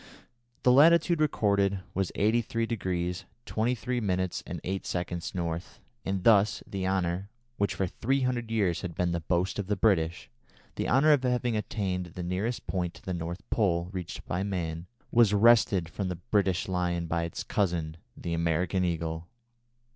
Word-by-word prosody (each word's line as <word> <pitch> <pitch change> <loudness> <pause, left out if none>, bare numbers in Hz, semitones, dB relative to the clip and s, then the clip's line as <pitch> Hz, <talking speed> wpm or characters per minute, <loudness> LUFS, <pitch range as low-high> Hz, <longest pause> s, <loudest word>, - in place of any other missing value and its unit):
The 125 - +6
latitude 165 +4 +5
recorded 100 -9 +2
was 95 -1 -1
83° 100 -5 0 0.2
23' 125 +2 -1
8" 95 -2 -2
N., 85 -1 -2 0.4
and 95 -1 -2
thus 105 -1 +4
the 95 -1 -3
honour, 95 0 -1 0.3
which 100 - 0
for 95 - 0
three 135 +9 -1
hundred 125 -3 -1
years 100 -7 +1
had 90 -4 -5
been 90 -1 0
the 85 - -1
boast 90 +4 0
of 100 - -3
the 105 - +1
British, 90 -6 +1 0.5
the - - -2
honour 140 +6 +5
of 145 - +3
having 125 -2 0
attained 95 -4 -2
the 90 - -4
nearest 95 +7 -2
point 90 -2 -2
to - - -15
the 95 - -3
North 85 +1 -5
Pole 90 -5 +1
reached 90 -3 -6
by 90 - -2
man, 85 -4 -3 0.2
was 115 -3 +5
wrested 105 -5 +5
from 95 +3 -4
the 90 - -2
British 95 +1 0
Lion 90 -2 -1
by 85 +1 -1
its 85 -1 -4
cousin, 85 -5 -1 0.2
the 85 - -4
American 85 +3 +1
Eagle. 85 -1 -2
95 Hz, 155 wpm, -29 LUFS, 85-110 Hz, 0.5 s, The